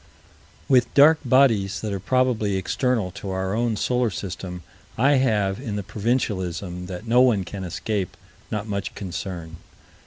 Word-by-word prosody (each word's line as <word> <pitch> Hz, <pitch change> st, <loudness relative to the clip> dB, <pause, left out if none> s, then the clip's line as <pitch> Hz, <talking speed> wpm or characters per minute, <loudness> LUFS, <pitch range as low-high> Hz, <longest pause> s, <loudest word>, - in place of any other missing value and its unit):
With 125 Hz, -3 st, +4 dB
dark 150 Hz, +2 st, +7 dB
bodies 115 Hz, -7 st, +3 dB
that 105 Hz, -2 st, -3 dB
are 100 Hz, -, -2 dB
probably 110 Hz, -2 st, +1 dB
external 110 Hz, 0 st, 0 dB
to 100 Hz, +1 st, -7 dB
our 95 Hz, 0 st, -2 dB
own 115 Hz, 0 st, 0 dB
solar 125 Hz, +2 st, +1 dB
system, 90 Hz, -2 st, -6 dB, 0.3 s
I 140 Hz, +4 st, +4 dB
have, 105 Hz, -7 st, +1 dB
in 115 Hz, -6 st, -4 dB
the 105 Hz, -, -3 dB
provincialism 95 Hz, -5 st, -2 dB
that 95 Hz, +4 st, -7 dB
no 120 Hz, +2 st, +4 dB
one 115 Hz, -7 st, +4 dB
can 95 Hz, +1 st, -7 dB
escape, 95 Hz, +2 st, -3 dB, 0.3 s
not 105 Hz, -1 st, -3 dB
much 100 Hz, -1 st, -3 dB
concern. 85 Hz, -3 st, -6 dB
105 Hz, 150 wpm, -24 LUFS, 95-125 Hz, 0.3 s, dark